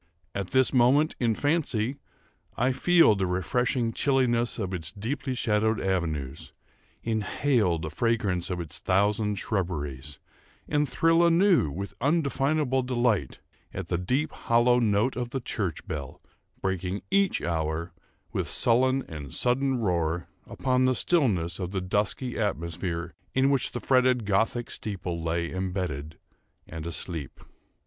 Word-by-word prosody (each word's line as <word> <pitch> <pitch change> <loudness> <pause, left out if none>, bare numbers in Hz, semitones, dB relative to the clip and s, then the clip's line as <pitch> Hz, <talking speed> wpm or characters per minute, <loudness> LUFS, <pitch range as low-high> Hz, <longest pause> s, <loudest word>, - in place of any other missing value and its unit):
At 100 -2 -3
this 130 +6 +2
moment, 135 +5 +4
in 115 -3 +2
fancy, 140 -5 0 0.6
I 125 +3 +2
feel 170 -1 +5
the 95 -2 -1
refreshing 115 +6 0
chilliness 120 -3 +1
of 95 -4 -3
its 80 -2 -3
deeply 125 +6 -3
shadowed 110 -1 +1
avenues, 80 -5 -2 0.5
inhale 110 -3 +1
the 80 -1 -5
fragrance 100 -3 0
of 90 -1 -2
its 85 -1 -6
thousand 105 +2 +1
shrubberies, 75 - -3 0.5
and 150 -1 +1
thrill 165 +1 +3
anew 170 - +4
with 100 +7 -5
undefinable 140 -2 +1
delight, 120 - 0 0.3
at - - -5
the 85 - +1
deep 135 - 0
hollow 120 +1 +3
note 110 +2 +2
of 125 -1 -3
the 135 - -3
church 100 -8 -3
bell, 70 -4 -5 0.4
breaking, 95 +1 -2
each 195 -1 +2
hour, 80 +1 -2 0.4
with - - -2
sullen 130 +3 +3
and 75 -4 -8
sudden 130 +2 +1
roar, 85 -5 0 0.2
upon 130 -1 +1
the 130 0 +3
stillness 100 - +1
of 90 -2 -3
the 95 0 -2
dusky 105 +7 -1
atmosphere 85 -3 -2 0.2
in 135 +1 +4
which 135 -3 +1
the 120 - -4
fretted 125 -3 +3
Gothic 110 +4 0
steeple 90 -5 -4
lay 85 +1 -1
imbedded 90 -5 -3 0.5
and 80 0 -6
asleep. 80 -3 -5
105 Hz, 135 wpm, -27 LUFS, 85-130 Hz, 0.6 s, feel